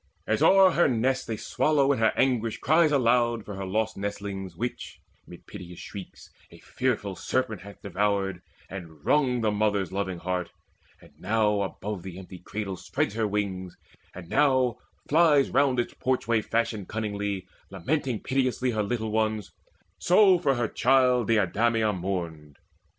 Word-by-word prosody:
As - - 0
o'er 190 -1 +6
her 175 - +3
nest 130 0 0
A 110 - -2
swallow 140 +2 +1
in 135 - 0
her 110 -1 +4
anguish 115 -4 +1
cries 155 +1 +3
aloud 120 -4 +2
For 105 - -7
her 95 -1 -5
lost 110 +3 -1
nestlings 100 -2 -5
which, 120 +5 -5 0.3
mid 90 - -13
piteous 90 -4 -10
shrieks, 95 +1 -10 0.2
A - - -15
fearful 110 -7 -2
serpent 110 0 -2
hath 100 +1 -13
devoured, 100 -1 -1 0.3
and 80 -6 -10
wrung 130 -5 +2
The 110 -1 +1
loving 105 - -3
mother's 100 -3 -1
heart; 90 -1 -2 0.5
and - - -18
now 105 +1 +1
above 100 0 -4
That 90 -1 -8
empty 95 -1 -10
cradle 100 0 -5
spreads 100 - -2
her 110 -1 0
wings, 95 -3 -3 0.4
and 90 -3 -9
now 130 - +2 0.3
Flies 150 -3 +4
round 135 -1 +2
its 120 - -2
porchway 115 -3 0
fashioned 110 -3 -2
cunningly 105 -3 -3 0.2
Lamenting 120 - -2
piteously 130 -1 0
her 110 -2 -1
little 110 +1 -2
ones: 110 -1 -1 0.5
So 185 0 +5
for 140 -6 +1
her 120 -2 0
child 125 -1 +3
Deidameia 110 +1 +2
mourned. 85 -6 -5
110 Hz, 150 wpm, -26 LUFS, 95-125 Hz, 0.5 s, o'er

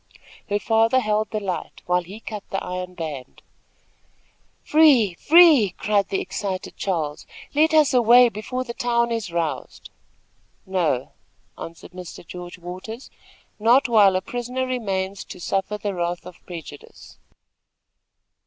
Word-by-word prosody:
Her 205 - +1
father 225 +4 +3
held 215 -2 0
the 215 - -2
light, 190 -3 -5
while 180 0 +2
he 190 +5 -10
cut 210 -3 -7
the 195 - -3
iron 180 0 -5
band. 150 -7 -7 1.2
"Free! 280 - +5
free!" 295 - +6
cried 205 -1 +1
the 195 - 0
excited 190 0 -4
Charles. 160 -6 -3 0.3
"Let 315 +2 +3
us 300 -4 +5
away 245 0 +7
before 235 +4 -4
the 235 -2 -7
town 235 0 0
is 225 -6 -3
roused!" 160 -6 -4 0.7
"No," 165 -9 -1 0.4
answered 165 +1 -10
Mr. 180 -1 -10
George 175 +1 -9
Waters; 185 +8 -8 0.5
"not 240 +6 +4
while 210 -5 +5
a 185 - +1
prisoner 245 +5 -3
remains 200 -6 -3
to - - -10
suffer 195 +3 -2
the 205 -1 -3
wrath 175 -1 -3
of 180 - -13
prejudice." 160 -5 -11
200 Hz, 135 wpm, -23 LUFS, 180-235 Hz, 1.2 s, away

